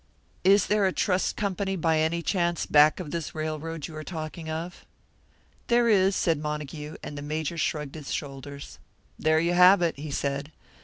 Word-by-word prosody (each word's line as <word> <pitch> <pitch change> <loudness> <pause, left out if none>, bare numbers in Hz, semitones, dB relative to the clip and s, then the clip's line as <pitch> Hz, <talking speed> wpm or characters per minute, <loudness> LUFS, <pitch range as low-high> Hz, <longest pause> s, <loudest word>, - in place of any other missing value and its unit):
"Is 195 +1 +5
there 210 -2 +2
a - - +1
trust 185 0 0
company 195 -1 -2
by 160 -2 +1
any 165 +2 0
chance 175 -3 0
back 150 +3 +5
of 160 -5 -6
this 165 -2 -4
railroad 155 0 -4
you 160 - -9
are 155 - -6
talking 160 -1 -6
of?" 165 +3 -5 0.8
"There 240 0 +3
is," 195 -3 +4
said 165 -3 +1
Montague; 150 0 -5
and 145 - -6
the 145 - -6
Major 155 +2 -3
shrugged 150 -2 -2
his 150 -3 -7
shoulders. 140 0 -6 0.4
"There 155 0 +3
you 170 +2 +1
have 180 +1 +7
it," 165 -4 -1
he 150 +1 -6
said. 140 +1 -2
160 Hz, 175 wpm, -27 LUFS, 150-180 Hz, 0.8 s, have